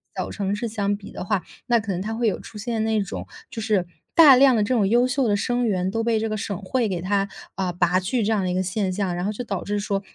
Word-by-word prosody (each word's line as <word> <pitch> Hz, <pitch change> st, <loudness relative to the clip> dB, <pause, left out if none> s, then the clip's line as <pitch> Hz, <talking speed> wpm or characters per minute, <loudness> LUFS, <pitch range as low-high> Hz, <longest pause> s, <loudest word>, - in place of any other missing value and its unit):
小 -, -, -3 dB
城 200 Hz, 0 st, -2 dB
市 235 Hz, +3 st, -3 dB
相 205 Hz, -2 st, -1 dB
比 200 Hz, -, -11 dB
的 -, -, -6 dB
话， 195 Hz, -1 st, 0 dB, 0.2 s
那 240 Hz, -2 st, +3 dB
可 205 Hz, -2 st, -4 dB
能 180 Hz, -, -2 dB
它 220 Hz, +3 st, -3 dB
会 230 Hz, 0 st, 0 dB
有 205 Hz, -, 0 dB
出 210 Hz, -, -10 dB
现 220 Hz, 0 st, -2 dB
那 220 Hz, -1 st, +1 dB
种， 195 Hz, -, -5 dB, 0.2 s
就 225 Hz, -, -6 dB
是 210 Hz, -5 st, +1 dB, 0.3 s
大 295 Hz, -6 st, +9 dB
量 265 Hz, -2 st, +6 dB
的 215 Hz, -, +2 dB
这 255 Hz, -, 0 dB
种 210 Hz, -5 st, +3 dB
优 240 Hz, +4 st, +4 dB
秀 260 Hz, -1 st, +1 dB
的 205 Hz, -, +2 dB
生 245 Hz, +3 st, 0 dB
源， 190 Hz, -2 st, 0 dB
都 225 Hz, -, -1 dB
被 230 Hz, -1 st, +2 dB
这 225 Hz, 0 st, -1 dB
个 215 Hz, -, -2 dB
省 200 Hz, -2 st, -3 dB
会 230 Hz, +4 st, 0 dB
给 180 Hz, -3 st, -3 dB
它， 195 Hz, +1 st, 0 dB, 0.3 s
啊， 185 Hz, -2 st, -1 dB
拔 180 Hz, +1 st, +2 dB
去 215 Hz, +5 st, -1 dB
这 220 Hz, -, +1 dB
样 205 Hz, -3 st, +1 dB
的 -, -, -1 dB
一 -, -, -1 dB
个 185 Hz, +1 st, 0 dB
现 190 Hz, +1 st, -1 dB
象。 190 Hz, -2 st, -1 dB
然 175 Hz, +2 st, -2 dB
后 210 Hz, -, 0 dB
就 245 Hz, -, -5 dB
导 195 Hz, -6 st, -3 dB
致 205 Hz, 0 st, -1 dB
说 200 Hz, -1 st, -1 dB
205 Hz, 315 characters per minute, -23 LUFS, 195-225 Hz, 0.3 s, 大